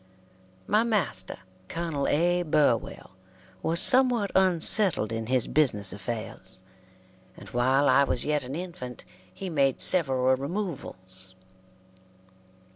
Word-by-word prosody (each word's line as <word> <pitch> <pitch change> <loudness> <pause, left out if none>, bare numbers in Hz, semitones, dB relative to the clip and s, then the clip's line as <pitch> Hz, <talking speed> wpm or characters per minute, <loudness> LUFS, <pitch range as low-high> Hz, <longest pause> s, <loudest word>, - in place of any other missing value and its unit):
My 210 +1 +1
master, 200 - -2 0.3
Col. 165 -4 -4
A. 175 +4 +1
Burwell, 145 - -1 0.5
was 165 - -1
somewhat 250 -6 +5
unsettled 185 - +4
in 115 0 -5
his 130 -1 0
business 105 -11 -1
affairs, 100 -2 -8 0.7
and 100 - -13
while 130 +5 +1
I 140 - +4
was 130 - -2
yet 150 -2 -1
an 130 +3 -7
infant 170 -8 -8 0.3
he 195 - -8
made 140 -6 0
several 130 -7 +2
removals. 130 - -4
140 Hz, 110 wpm, -26 LUFS, 120-175 Hz, 0.7 s, somewhat